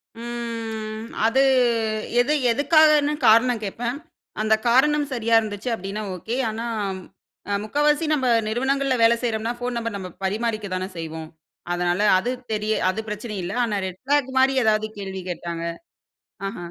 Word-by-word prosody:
ம் 230 -2 -5 0.2
அது, 260 +4 +3 0.8
எது 280 +5 +1 0.2
எதுக்காகன்னு 300 +2 +4
காரணம் 230 +1 +5
கேப்பேன். 235 +5 -3 0.4
அந்த 215 0 +3 0.2
காரணம் 295 +4 +4
சரியா 230 -2 +1
இருந்துச்சு 215 +1 -4
அப்டின்னா, 200 +1 -5
ஓகே. 225 +8 -4
ஆனா 225 +2 -5 0.9
அ - - +1
முக்காவாசி 295 +7 +1
நம்ம 265 -4 +1 0.2
நிறுவனங்கள்ள 265 +4 0
வேலை 230 +1 +6
செய்றோம்னா, 225 -1 -1
ஃபோன் 245 0 -3
நம்பர் 230 -2 -3
நம்ம 185 -2 -6
பரிமாறிக்கதான 205 -2 -2
செய்வோம். 160 -1 -6 0.4
அதனால 175 +2 0 0.2
அது 240 +7 -1 0.2
தெரிய 215 0 0 0.2
அது 190 +4 -2
பிரச்சனை 210 +1 -5
இல்லை. 180 +5 -4
ஆனா 215 -3 -1
ரெட் 185 -1 -7
ஃபிளாக் 280 0 +1
மாரி 265 +1 +4
ஏதாவது 215 0 +2
கேள்வி 190 -1 -5
கேட்டாங்க 170 -1 -4 0.8
ஆஹ, 195 - -6
225 Hz, 135 wpm, -23 LUFS, 205-250 Hz, 0.9 s, வேலை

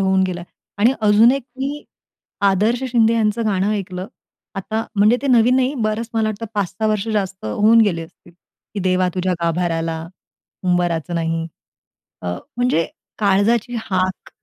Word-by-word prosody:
होऊन 190 0 +3
गेला 175 -1 -4 0.4
आणि 235 +5 +4
अजून 215 +2 +6
एक 275 -1 -2 0.2
मी 285 +2 -3 0.6
आदर्श 215 +6 +1
शिंदे 230 -1 +4
यांचं 220 0 +1
गाणं 200 0 +1
ऐकलं. 185 -2 -4 0.5
आता, 220 +4 -3
म्हणजे 210 +4 +5
ते - - -1
नवीन 245 -1 +4
नाही, 260 +2 +1
बरंच 215 +2 -1
मला 220 -1 +1
वाटतं 215 +2 -4
5-6 200 +2 -1
वर्ष 215 0 0
जास्त 195 -3 -2
होऊन 215 - +4
गेले 175 -6 +2
असतील, 170 +1 -16 0.4
की 200 - -2
देवा 185 0 +2
तुझ्या 185 0 0
गाभाराला 165 -1 -1 0.6
उंबराचं 175 -2 0
नाही. 165 0 -1 0.8
अ, 90 - -5 0.3
म्हणजे 245 -10 +2 0.3
काळजाची 210 +4 +2
हाक 185 -2 -2
205 Hz, 145 wpm, -20 LUFS, 180-225 Hz, 0.8 s, अजून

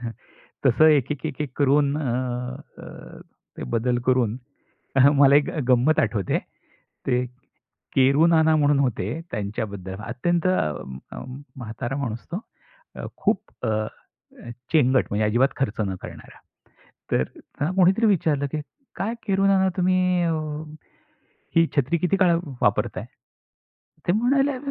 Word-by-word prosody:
हं, 115 - -3 0.6
तसं 135 +5 +5
एकेक-एकेक 145 -1 0
करून, 145 0 +3
अ, 155 - -2 0.8
अ, - - -11 0.4
ते - - -6
बदल 120 +1 +1
करून 125 -3 +2 0.6
अ, - - +5
मला 140 -1 +5
एक 145 - +2 0.2
गंमत 130 +5 +4
आठवते. 100 -5 0 0.7
ते 125 -1 +1 0.7
केरू 140 +5 +5
नाना 160 -1 +4
म्हणून 145 -1 +3
होते 125 -8 0 0.2
त्यांच्याबद्दल. 100 -2 -4
अत्यंत, 170 +9 0
अ, 75 - -2 0.4
म्हातारा 120 +2 -5
माणूस 115 -5 -4
तो. - - -1 0.6
अ, - - -5
खूप, - - +1 0.2
अ, - - 0
अ, 110 +2 -6 0.2
चेंगट 130 -5 +4
म्हणजे 105 +1 +1
अजिबात 120 +5 +3
खर्च 115 -5 -2
न 95 - -3
करणारा. - - -11 0.7
तर 65 - +3
त्यांना 150 +5 -5
कोणीतरी 190 +4 +4
विचारलं, 155 -8 +2
की 150 - -2 0.3
"काय 215 +4 -2
केरू 195 0 +2
नाना, 190 -1 +4
तुम्ही, 185 0 +3 0.2
अ, 165 -1 +1 1.2
ही 165 0 +6
छत्री 140 +5 +2
किती 180 +3 +1
काळापासून 170 -6 +1
वापरताय?" - - 0 1.0
ते 175 - +4
म्हणाले, 270 +5 +2
140 Hz, 125 wpm, -24 LUFS, 120-170 Hz, 1.2 s, ही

